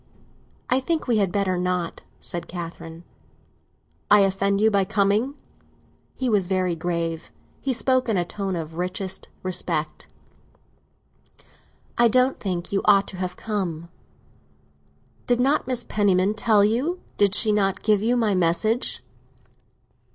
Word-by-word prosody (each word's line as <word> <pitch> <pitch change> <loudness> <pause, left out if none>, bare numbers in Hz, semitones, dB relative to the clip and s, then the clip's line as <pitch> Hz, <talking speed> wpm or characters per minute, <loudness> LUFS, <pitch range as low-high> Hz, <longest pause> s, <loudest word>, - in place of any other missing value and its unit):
"I 255 - +2
think 320 +4 -1
we 235 -3 +1
had 195 -4 +1
better 190 -2 0
not," 180 -1 -2 0.2
said 170 -1 -6
Catherine. 165 -1 -8 1.1
"I 210 0 +7
offend 195 +1 +1
you 220 +1 +4
by 200 -1 +3
coming?" 210 +6 +1 0.8
He 260 - -2
was 205 -6 +2
very 185 -2 0
grave; 165 -1 -3 0.3
he 275 - -1
spoke 255 +1 +1
in 215 - +1
a 175 - 0
tone 195 +1 -3
of 160 -2 -5
the 160 - -12
richest 185 +2 -3
respect. 185 -1 -2 1.9
"I 240 - +7
don't 255 +3 +2
think 180 -3 -3
you 195 - +1
ought 195 0 +5
to 190 - -9
have 180 -1 -4
come." 175 -6 -3 1.4
"Did 245 -1 +2
not 270 +1 +2
Mrs. 250 -2 -2
Penniman 200 -1 +2
tell 215 -1 +3
you—did 230 - 0
she 220 -2 +4
not 195 -2 0
give 210 -2 +3
you 240 +3 +1
my 220 -4 +2
message?" 185 +7 +1
200 Hz, 135 wpm, -24 LUFS, 180-225 Hz, 1.9 s, I